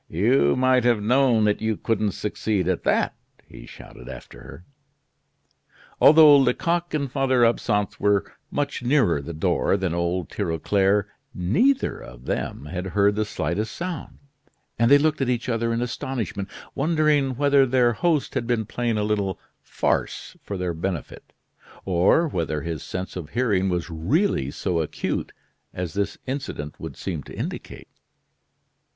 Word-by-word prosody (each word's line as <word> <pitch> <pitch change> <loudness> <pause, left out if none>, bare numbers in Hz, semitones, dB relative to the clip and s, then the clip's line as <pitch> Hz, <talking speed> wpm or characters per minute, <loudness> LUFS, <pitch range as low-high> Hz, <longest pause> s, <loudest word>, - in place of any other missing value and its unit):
"You 70 +1 +3
might 130 -1 +3
have 120 -3 +3
known 120 +1 +3
that 105 0 +1
you 110 -1 0
couldn't 110 -3 0
succeed 105 -2 -2
at 95 -2 -1
that!" - - +2 0.3
he - - -13
shouted 60 - -12
after - - -10
her. 85 - -12 1.4
Although 150 -1 +8
Lecoq 170 +6 +1
and 140 -4 -2
Father 130 -3 +3
Absinthe 105 -3 0
were 105 -1 +2 0.2
much 145 -1 -2
nearer 120 - +2
the 70 - -7
door 80 +4 +1
than 95 -4 -2
old 85 0 -2
Tirauclair, 95 +5 +1 0.3
neither 225 - +1
of - - -12
them - - -3
had 90 +4 -5
heard 100 0 +4
the 110 0 0
slightest 105 +1 -3
sound; 175 -4 -6 0.6
and 115 0 +4
they 140 - +8
looked 150 0 +1
at 130 - +1
each 120 0 -1
other 115 -1 0
in 115 +1 0
astonishment, 120 -5 -4 0.2
wondering 150 -3 +1
whether 140 0 +4
their 120 -1 +3
host 160 +2 0
had 115 - -2
been 120 -3 0
playing 115 +1 -2
a 105 - 0
little 100 -3 -1 0.2
farce - - -2
for 100 - -5
their 90 -1 -2
benefit, 85 -1 -5 0.5
or 95 - +3
whether 80 - -2
his 80 -3 -4
sense 90 +1 -5
of 85 -5 -6
hearing 105 -5 +1
was 90 -1 -2
really 85 - 0
so 85 +3 -2
acute 75 - -3 0.4
as 90 -3 -4
this 100 0 -2
incident 130 - -5
would - - -7
seem 85 -6 -4
to - - -11
indicate. - - -6
105 Hz, 150 wpm, -24 LUFS, 90-130 Hz, 1.4 s, Although